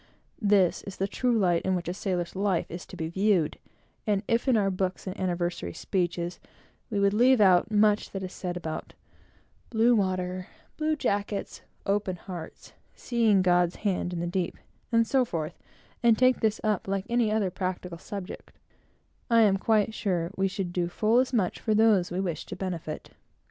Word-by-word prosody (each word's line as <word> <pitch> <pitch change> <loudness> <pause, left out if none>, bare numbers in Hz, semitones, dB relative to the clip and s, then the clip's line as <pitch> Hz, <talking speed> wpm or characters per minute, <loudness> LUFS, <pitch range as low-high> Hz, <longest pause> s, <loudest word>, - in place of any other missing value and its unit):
This 200 -4 +3
is 195 - -6
the 195 - 0
true 245 +3 +1
light 175 -5 +2
in 190 0 0
which 175 -2 -4
a 175 - -1
sailor's 180 -3 -3
life 195 -2 +1
is 175 +1 -7
to - - -10
be 160 - -2
viewed; 190 -2 +1 0.5
and 205 -1 +1
if 230 +3 +1
in 250 -3 +4
our 195 -2 +2
books, 185 0 -2
and 185 -1 -4
anniversary 175 - -2
speeches, 175 -1 -2 0.5
we 210 -4 -1
would 200 0 +3
leave 250 +3 +5
out 185 -2 +5
much 210 0 +3
that 195 -1 -5
is 185 - -6
said 180 -1 -4
about 160 -2 -6 0.7
"blue 235 +1 +4
water," 185 -2 -1 0.3
"blue 310 0 0
jackets," 205 -6 -2 0.2
"open 200 -2 0
hearts," 175 -2 -9 0.2
"seeing 225 -6 +2
God's 175 -1 +3
hand 185 -2 0
on 175 -1 -3
the - - -1
deep," 175 0 -2 0.3
and 230 -1 +4
so 260 +3 +3
forth, 165 -7 -4 0.4
and 235 -2 +5
take 255 0 +4
this 215 -1 +1
up 210 -3 0
like 195 0 -1
any 235 -2 +2
other 210 -4 +1
practical 180 -2 -4
subject, 195 0 -7 0.8
I 230 -1 +5
am 200 -3 +4
quite 215 +1 +2
sure 180 -6 -1
we 195 0 +1
should 190 -2 -4
do 175 -1 0
full 215 +7 +2
as 260 0 +1
much 210 -8 0
for 215 - 0
those 210 -5 +4
we 180 - -3
wish 180 -4 -3
to - - -6
benefit. 170 -5 -5
195 Hz, 180 wpm, -27 LUFS, 180-215 Hz, 0.8 s, leave